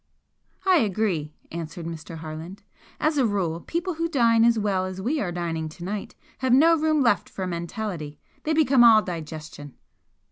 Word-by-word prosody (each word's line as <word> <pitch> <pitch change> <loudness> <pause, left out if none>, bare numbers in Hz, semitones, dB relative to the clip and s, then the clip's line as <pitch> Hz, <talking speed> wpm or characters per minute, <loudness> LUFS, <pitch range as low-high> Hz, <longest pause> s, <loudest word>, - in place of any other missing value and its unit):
"I 375 -2 +5
agree," 190 - 0 0.2
answered 165 0 -6
Mr. 165 0 -7
Harland. 160 +4 -8 0.4
"As 305 -1 +1
a 260 - +4
rule 180 -6 -1
people 345 - -3
who 330 +1 -2
dine 230 -6 +4
as 235 0 +4
well 195 -3 0
as 185 0 -6
we 275 +10 -1
are 180 - -2
dining 165 -2 -3
to 165 +2 -11
night 200 +3 -5 0.2
have 260 -2 +2
no 325 +6 +6
room 310 -1 +2
left 205 -7 +2
for 190 - -5
mentality 170 -3 -5 0.2
they 315 - -1
become 275 -5 +5
all 220 -2 +7
digestion!" 155 -4 -7
195 Hz, 170 wpm, -25 LUFS, 165-255 Hz, 0.4 s, all